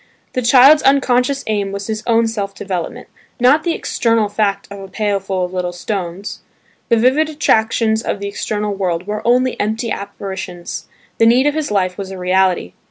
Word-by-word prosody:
The 255 Hz, -, 0 dB
child's 265 Hz, +5 st, +7 dB
unconscious 270 Hz, 0 st, +2 dB
aim 205 Hz, -2 st, -1 dB
was 200 Hz, 0 st, -5 dB
his 215 Hz, 0 st, -3 dB
own 230 Hz, -1 st, +3 dB
self 205 Hz, -3 st, -3 dB
development; 185 Hz, -4 st, -5 dB, 0.3 s
not 260 Hz, +5 st, +5 dB
the 340 Hz, -2 st, -1 dB
external 225 Hz, -3 st, 0 dB
fact 200 Hz, -1 st, -1 dB
of 200 Hz, -, -8 dB
a 195 Hz, -, -8 dB
pail 205 Hz, 0 st, -1 dB
full 190 Hz, -1 st, -2 dB
of 180 Hz, -, -9 dB
little 180 Hz, -1 st, -2 dB
stones. 185 Hz, +1 st, -5 dB, 0.5 s
The 230 Hz, -, +4 dB
vivid 265 Hz, +7 st, +3 dB
attractions 220 Hz, -6 st, +1 dB
of 205 Hz, -, -3 dB
the 200 Hz, -, -4 dB
external 210 Hz, +1 st, -3 dB
world 180 Hz, -3 st, -2 dB
were 210 Hz, +1 st, -3 dB
only 250 Hz, +1 st, +2 dB
empty 220 Hz, +2 st, -1 dB
apparitions; 190 Hz, -3 st, -6 dB, 0.3 s
the 225 Hz, -, +5 dB
need 250 Hz, +4 st, +4 dB
of 295 Hz, -, +2 dB
his 310 Hz, -1 st, -2 dB
life 185 Hz, -2 st, 0 dB
was 195 Hz, -1 st, -5 dB
a 190 Hz, -, -7 dB
reality. 180 Hz, -, +1 dB
210 Hz, 180 wpm, -17 LUFS, 195-240 Hz, 0.5 s, child's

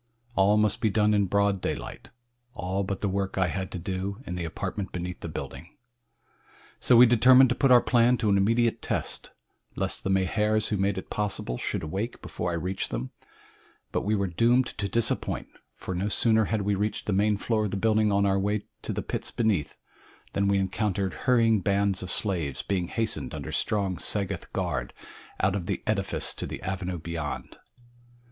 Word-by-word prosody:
All 100 Hz, +1 st, +4 dB
must 105 Hz, -1 st, +2 dB
be 110 Hz, -, +3 dB
done 105 Hz, +1 st, +3 dB
in 100 Hz, -2 st, +2 dB
broad 100 Hz, 0 st, +1 dB
daylight -, -, -5 dB, 0.5 s
all 95 Hz, -1 st, -2 dB
but 100 Hz, 0 st, -4 dB
the 105 Hz, -, +1 dB
work 95 Hz, 0 st, -2 dB
I 95 Hz, -2 st, +2 dB
had 95 Hz, +2 st, -3 dB
to -, -, -3 dB
do 95 Hz, +3 st, -3 dB
in -, -, -5 dB
the 90 Hz, -1 st, -3 dB
apartment 95 Hz, +4 st, -4 dB
beneath 90 Hz, 0 st, -5 dB
the 85 Hz, -, -6 dB
building. 85 Hz, +2 st, -8 dB, 1.0 s
So 125 Hz, -, +5 dB
we 125 Hz, -, +10 dB
determined 125 Hz, +2 st, +6 dB
to 125 Hz, -, +1 dB
put 135 Hz, 0 st, +3 dB
our 125 Hz, -1 st, +7 dB
plan 120 Hz, 0 st, +4 dB
to 110 Hz, -, 0 dB
an -, -, +4 dB
immediate 115 Hz, +3 st, +2 dB
test -, -, -3 dB, 0.4 s
lest -, -, -2 dB
the -, -, -2 dB
Mahars 105 Hz, +3 st, +1 dB
who 105 Hz, -, 0 dB
made 100 Hz, 0 st, 0 dB
it 95 Hz, -, -7 dB
possible 100 Hz, -12 st, -2 dB
should -, -, -3 dB
awake 95 Hz, +9 st, -3 dB
before 90 Hz, -, -4 dB
I 85 Hz, -, -1 dB
reached 90 Hz, +3 st, -3 dB
them; -, -, -4 dB, 0.8 s
but -, -, 0 dB
we 105 Hz, +2 st, 0 dB
were 100 Hz, -1 st, 0 dB
doomed 115 Hz, +8 st, +3 dB
to 100 Hz, -1 st, -1 dB
disappointment, 115 Hz, -1 st, -1 dB
for 95 Hz, -, -6 dB
no 95 Hz, +4 st, -1 dB
sooner 110 Hz, 0 st, +3 dB
had 105 Hz, 0 st, -1 dB
we 100 Hz, +1 st, +1 dB
reached 105 Hz, +2 st, -2 dB
the 105 Hz, -, 0 dB
main 105 Hz, +1 st, +2 dB
floor 110 Hz, +1 st, 0 dB
of -, -, -1 dB
the 100 Hz, -, -3 dB
building 110 Hz, 0 st, +2 dB
on 100 Hz, 0 st, +3 dB
our 95 Hz, 0 st, +2 dB
way 105 Hz, +1 st, 0 dB, 0.2 s
to -, -, -4 dB
the -, -, -3 dB
pits -, -, -3 dB
beneath, 105 Hz, -10 st, 0 dB, 0.6 s
than 100 Hz, 0 st, +1 dB
we 100 Hz, 0 st, +3 dB
encountered 95 Hz, 0 st, -1 dB
hurrying 115 Hz, -3 st, +3 dB
bands 100 Hz, 0 st, +1 dB
of 90 Hz, -, -5 dB
slaves 85 Hz, -10 st, 0 dB
being 90 Hz, -3 st, -1 dB
hastened 115 Hz, +3 st, -2 dB
under -, -, -6 dB
strong 100 Hz, -4 st, 0 dB
Sagoth 100 Hz, -2 st, -2 dB
guard -, -, -2 dB, 0.4 s
out 95 Hz, +1 st, +2 dB
of 90 Hz, -4 st, -3 dB
the -, -, -2 dB
edifice 100 Hz, -3 st, 0 dB
to -, -, -5 dB
the -, -, -7 dB
avenue 95 Hz, -1 st, -3 dB
beyond. 80 Hz, -2 st, -5 dB
100 Hz, 195 wpm, -27 LUFS, 95-110 Hz, 1.0 s, we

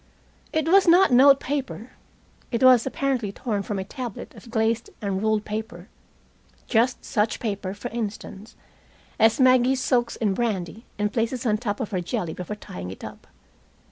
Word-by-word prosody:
It 315 Hz, -1 st, 0 dB
was 380 Hz, +2 st, +5 dB
not 355 Hz, +1 st, +6 dB
note 275 Hz, +2 st, +7 dB
paper. 265 Hz, -4 st, -4 dB, 0.6 s
It 235 Hz, 0 st, -1 dB
was 255 Hz, -2 st, +6 dB
apparently 265 Hz, -6 st, -1 dB
torn 210 Hz, -1 st, -3 dB
from 200 Hz, +1 st, -4 dB
a 190 Hz, -, -2 dB
tablet 240 Hz, +1 st, -7 dB
of 240 Hz, -, -14 dB
glazed 225 Hz, 0 st, 0 dB
and 195 Hz, -2 st, -2 dB
ruled 215 Hz, -1 st, 0 dB
paper 210 Hz, -3 st, -6 dB, 0.8 s
just 240 Hz, +2 st, +1 dB
such 215 Hz, 0 st, 0 dB
paper, 200 Hz, -3 st, -4 dB
for 245 Hz, +4 st, -6 dB
instance, 215 Hz, -1 st, -6 dB, 0.6 s
as 225 Hz, +2 st, +4 dB
Maggie 255 Hz, 0 st, +5 dB
soaks 250 Hz, -2 st, 0 dB
in 210 Hz, -4 st, 0 dB
brandy 215 Hz, -1 st, -3 dB
and 210 Hz, 0 st, -1 dB
places 235 Hz, +2 st, -1 dB
on 215 Hz, -2 st, +1 dB
top 205 Hz, -3 st, -3 dB
of 225 Hz, -5 st, -4 dB
her 185 Hz, -3 st, -1 dB
jelly 170 Hz, -1 st, -3 dB
before 180 Hz, +3 st, -6 dB
tying 90 Hz, -, -8 dB
it 95 Hz, -, -10 dB
up. -, -, -10 dB
225 Hz, 165 wpm, -24 LUFS, 205-255 Hz, 0.8 s, note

